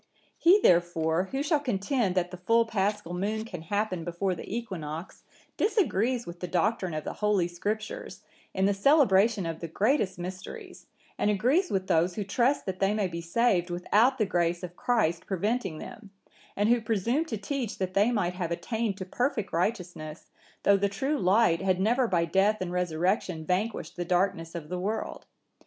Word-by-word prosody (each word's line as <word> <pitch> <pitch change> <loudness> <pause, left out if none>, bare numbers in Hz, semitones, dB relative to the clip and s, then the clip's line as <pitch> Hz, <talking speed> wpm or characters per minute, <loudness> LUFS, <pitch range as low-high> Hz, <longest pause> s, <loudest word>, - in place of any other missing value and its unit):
'(970) 335 - +3
"He, 400 +3 +7
therefore, 170 -1 +2
who 270 +8 -3
shall 300 0 +2
contend 230 -4 0
that 180 -1 0
the 180 - -7
full 230 +6 +3
Paschal 210 -4 -1
moon 210 +4 -2
can 180 -8 -7
happen 185 0 -2
before 175 +3 -1
the 175 - -8
equinox, 180 -8 -5 0.4
disagrees 255 - +1
with 170 0 -9
the 180 - -4
doctrine 185 0 0
of 155 - -3
the - - -4
Holy 210 -4 +1
Scriptures, 205 +1 -5 0.3
in 190 - 0
the 200 - +3
celebration 210 - +4
of 165 -1 -4
the 165 - -5
greatest 205 - +1
mysteries, 185 +2 -8 0.3
and - - +2
agrees 255 - +2
with 190 -1 -1
those 175 +1 +2
who 210 - -2
trust 245 +8 +1
that 185 -1 -4
they 195 +2 +2
may 210 -2 +1
be 170 -1 -5
saved 180 0 +1
without 210 +9 +2
the 215 - +2
grace 175 -1 0
of 175 0 -7
Christ 180 -9 0
preventing 195 -2 -1
them,(971) 210 +5 -10 0.5
and 205 +2 +1
who 240 0 +4
presume 230 - 0
to 230 -9 -4
teach 235 +2 -3
that 185 -1 -3
they 205 +5 +3
might 180 -6 0
have 180 -2 -3
attained 200 +4 -2
to 185 - -5
perfect 240 +1 -2
righteousness, 170 -4 -3 0.3
though 200 - +5
the 200 +1 +1
true 270 +9 -1
Light 185 -3 +3
had 185 -1 +1
never 240 +5 +2
by 170 -4 +1
death 195 +5 +2
and 185 -1 -3
resurrection 180 0 -1
vanquished 200 +6 -2
the 175 - -1
darkness 175 -1 0
of 155 -3 -6
the 180 - -3
world. 210 +4 -4
195 Hz, 180 wpm, -28 LUFS, 175-225 Hz, 0.5 s, He